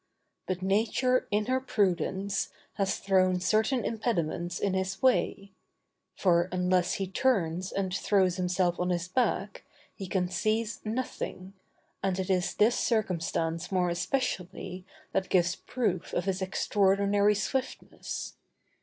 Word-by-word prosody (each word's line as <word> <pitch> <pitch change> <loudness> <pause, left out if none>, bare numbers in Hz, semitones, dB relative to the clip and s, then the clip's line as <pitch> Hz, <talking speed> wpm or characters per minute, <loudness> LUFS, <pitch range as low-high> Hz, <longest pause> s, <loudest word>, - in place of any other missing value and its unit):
But 185 0 -2
Nature, 230 +6 +2
in 210 +1 +1
her 255 +2 +1
prudence, 195 - 0 0.2
has 195 -1 0
thrown 185 -2 +2
certain 215 +8 +1
impediments 175 -7 -1
in 195 - 0
his 190 0 -1
way; 200 -6 +1 0.6
for, 175 -1 +3
unless 180 0 +1
he 195 - -1
turns 185 -4 0
and 190 -2 -2
throws 190 -2 +2
himself 180 -1 +1
on 180 0 0
his 175 -1 -1
back, 205 -1 -1 0.3
he 195 - -7
can 180 0 0
seize 215 +4 -1
nothing, 215 -5 -4 0.5
and 190 -1 0
it 190 0 -1
is 180 -1 +1
this 220 +3 +3
circumstance 170 -6 -1
more 180 -2 +2
especially 185 -2 -3 0.2
that 190 - -1
gives 175 -1 +3
proof 205 -9 -2
of 175 - 0
his 190 -1 -1
extraordinary 200 +2 +2
swiftness. 265 +5 -4
190 Hz, 125 wpm, -29 LUFS, 180-210 Hz, 0.6 s, for